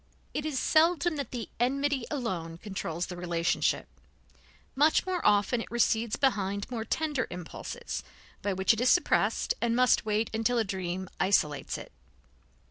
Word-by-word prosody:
It 300 - -2
is 295 -4 -2
seldom 330 +3 +3
that 280 -5 -3
the 240 -3 -5
enmity 275 +1 +1
alone 185 - -3
controls 175 -3 -4
the 180 - -7
relationship; 175 -1 0 0.9
much 300 +4 +4
more 370 -2 -1
often 210 +3 +3
it - - -8
recedes 230 -2 +1
behind 200 -6 0
more 230 -3 -2
tender 295 0 -1
impulses, 180 - -6 0.4
by 205 - -1
which 190 +3 +3
it 225 - -2
is 250 - +4
suppressed, 360 - +2
and 235 -1 +1
must 250 0 +4
wait 215 +1 0
until 225 +2 +1
a 230 - +3
dream 185 -2 -3
isolates 150 -7 +1
it. - - -10
225 Hz, 150 wpm, -29 LUFS, 190-275 Hz, 0.9 s, much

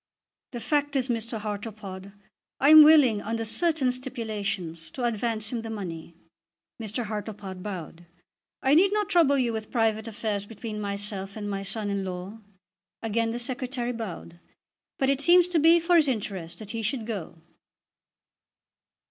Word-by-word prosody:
"The 240 - -6
fact 290 +4 0
is, 260 -1 +1
Mr. 230 -1 -2
Hartlepod, 205 -2 -6 0.5
I 280 - +4
am 310 0 +11
willing, 295 -9 +6
under 225 +1 -3
certain 300 +1 +2
stipulations, 205 - -4
to 245 - -6
advance 225 -2 -1
him 235 -2 -2
the 225 - -7
money." 170 -6 -6 0.7
Mr. 220 +2 -3
Hartlepod 205 -3 -6
bowed. 175 -3 -7 0.6
"I 265 - +4
need 375 +6 +5
not 420 -1 0
trouble 305 -5 +4
you 240 -3 +1
with 220 -1 -5
private 220 -2 0
affairs 210 -2 -3
between 220 -1 -6
myself 200 -1 -3
and 205 -1 -4
my 200 -1 -3
son 205 +1 -2
in 200 -1 -1
law." 185 +3 -6 0.6
Again 225 +1 0
the 230 - -3
Secretary 245 0 -2
bowed. 180 -6 -7 0.6
"But 270 0 +2
it 275 0 0
seems 350 +3 +6
to 345 -2 +2
be 330 +3 +6
for 340 +1 +3
his 310 -3 +4
interest 195 -8 -3
that 205 0 -8
he 230 - -3
should 225 +1 -2
go." 205 -9 -5
225 Hz, 155 wpm, -27 LUFS, 200-255 Hz, 0.7 s, am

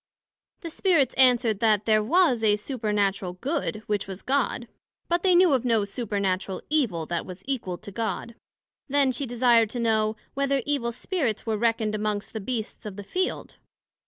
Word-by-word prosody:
The 335 -3 -6
Spirits 320 - +2
answered, 245 -5 +4
That 215 -2 +2
there 215 -1 +4
was 275 -3 +3
a 210 -1 +4
Supernatural 210 -5 -1
Good, 245 - -3
which 205 -2 -2
was 190 0 -8
God; 260 -3 0 0.4
but 345 0 +1
they 370 -1 +4
knew 350 -3 +5
of 255 -3 +1
no 230 -4 +2
Supernatural 200 -3 -2
Evil, 220 - +1
that 170 +1 -2
was 185 +1 -10
equal 230 -10 -3
to 200 - -10
God. 230 +2 -3 0.6
Then 275 -1 +3
she 255 +2 -3
desired 235 -2 +3
to 240 - -5
know, 220 -2 +1 0.2
Whether 275 -1 0
Evil 275 -5 0
Spirits 250 - -2
were 220 -1 0
reckoned 225 -1 0
amongst 210 -1 -2
the 220 - -3
Beasts 220 -1 -4
of 200 - -7
the 205 - -7
Field? 370 - -3
230 Hz, 170 wpm, -26 LUFS, 210-270 Hz, 0.6 s, knew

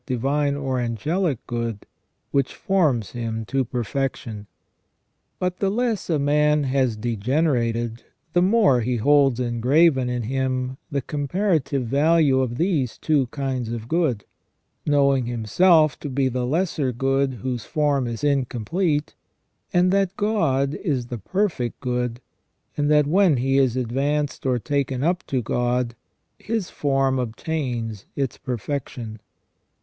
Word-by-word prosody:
divine 140 +3 0
or 135 -2 -2
angelic 145 - -1
good 115 -3 -4 0.5
which 140 -2 0
forms 150 - +1
him 115 -2 -4
to 135 +3 0
perfection. 120 -3 -3 0.9
But 180 0 -2
the 195 - +1
le; 235 +3 +1
fs 190 - -11
a 160 - +2
man 150 +1 +2
has 130 -4 +1
degenerated, 120 0 0 0.3
the 175 - +4
more 190 - +4
he 125 +2 0
holds 135 +1 +3
engraven 125 +3 +3
in 125 -1 -2
him 130 +1 -2
the 140 -4 -2
comparative 145 -2 0
value 145 +2 +3
of 120 -2 -1
these 155 - 0
two 145 -5 +1
kinds 130 -3 -3
of 115 -1 -5
good, 150 -9 0 0.6
knowing 140 -4 +3
himself 145 - +3
to 145 - -5
be 135 0 +1
the 125 0 -2
lesser 155 -3 0
good 135 +2 0
whose 120 0 -4
form 145 -5 +1
is 115 +1 -5
incomplete, 145 - 0 0.6
and 180 +1 +3
that 195 0 +1
God 155 -11 +1
is 145 -6 -2
the 120 -1 -6
perfect 165 - -1
good, 125 -2 -2 0.6
and 145 0 0
that 150 -1 +5
when 175 -1 +4
he 135 +2 +2
is 130 -3 +2
advanced 140 +4 -1
or 125 -1 +2
taken 135 +1 -1
up 175 +3 +1
to 130 -4 -1
God, 120 +1 0 0.5
his 220 -4 -3
form 135 -2 +1
obtains 120 -4 -3
its 135 -3 -2
perfection. 120 -3 -5
135 Hz, 135 wpm, -23 LUFS, 120-150 Hz, 0.9 s, that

